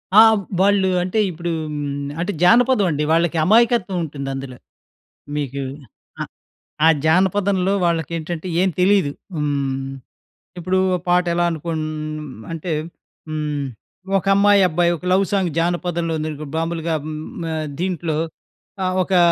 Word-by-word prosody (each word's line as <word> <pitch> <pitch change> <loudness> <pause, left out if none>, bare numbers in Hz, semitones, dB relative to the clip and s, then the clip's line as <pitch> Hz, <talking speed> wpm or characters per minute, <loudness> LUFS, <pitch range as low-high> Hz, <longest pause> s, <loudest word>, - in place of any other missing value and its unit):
ఆ! - - +10 0.4
వాళ్ళు 195 -1 +4
అంటే 185 +4 -1
ఇప్పుడూ 170 0 -4 0.2
హ్మ్, 145 -1 -3
అంటే 180 +4 -1
జానపదవండి. 200 - +4
వాళ్ళకి 170 0 +2
అమాయకత్వవుంటుందందులో. 165 - +1 0.8
మీకూ 140 -2 -3 0.6
ఆహ్, - - -9 0.6
ఆ - - +7 0.2
జానపదంలో 190 +3 +2
వాళ్ళకేంటంటే, 165 +1 -2
ఏం 190 - +3
తెలీదు. 185 -5 +3 0.2
హ్మ్. 140 -3 -1 0.7
ఇప్పుడూ 185 +2 0 0.2
ఓ - - +3
పాటెలా 175 -1 +2
అనుకోన్ 160 -1 -3 0.7
అంటే, 165 +1 -4 0.6
హ్మ్, 150 -2 -2 0.5
ఒక 195 - -7
అమ్మాయబ్బాయి 190 -4 +4
ఒక 165 - -14
లవ్ 195 +1 +4
సాంగ్ 190 -3 +1
జానపదంలో 170 0 0
ఉందానుకో, 155 -1 -4
బాంబులుగా 165 0 -1
హ్మ్, 155 -1 -5 0.3
ఆహ్, 155 -1 -3
దీంట్లో 175 -4 -1 0.7
ఆహ్, 185 0 0
ఒకా 185 0 +2
170 Hz, 110 wpm, -21 LUFS, 155-185 Hz, 0.8 s, ఆ